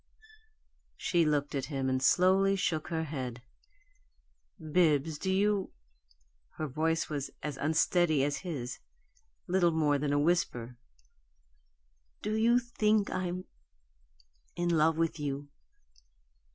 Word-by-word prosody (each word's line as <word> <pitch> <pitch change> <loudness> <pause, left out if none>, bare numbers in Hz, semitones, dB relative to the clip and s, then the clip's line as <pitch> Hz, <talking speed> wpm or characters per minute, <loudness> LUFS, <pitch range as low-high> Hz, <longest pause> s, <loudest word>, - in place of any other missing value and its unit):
She 170 -2 +1
looked 145 -1 0
at 135 -2 -2
him, 135 -3 -3
and 130 0 0
slowly 190 +6 +4
shook 165 -5 -1
her 160 -1 -2
head. 130 -6 -5 1.2
"Bibbs, 155 -2 +1
do 190 - -1
you 200 0 +1 0.4
" - - -37
Her 155 - -2
voice 160 +3 0
was 145 -3 -4
as 150 -2 -3
unsteady 160 0 +2
as 145 +1 0
his 140 -9 -5 0.7
little 180 -1 +3
more 150 -3 +1
than 145 0 -1
a 145 - +2
whisper. 145 -7 0 1.5
"Do 210 - -1
you 230 +2 +4
think 215 -4 +1
I'm 185 0 -3 1.1
in 175 0 -1
love 160 +1 +3
with 165 -1 0
you?" 145 0 -4
160 Hz, 120 wpm, -30 LUFS, 145-180 Hz, 1.5 s, slowly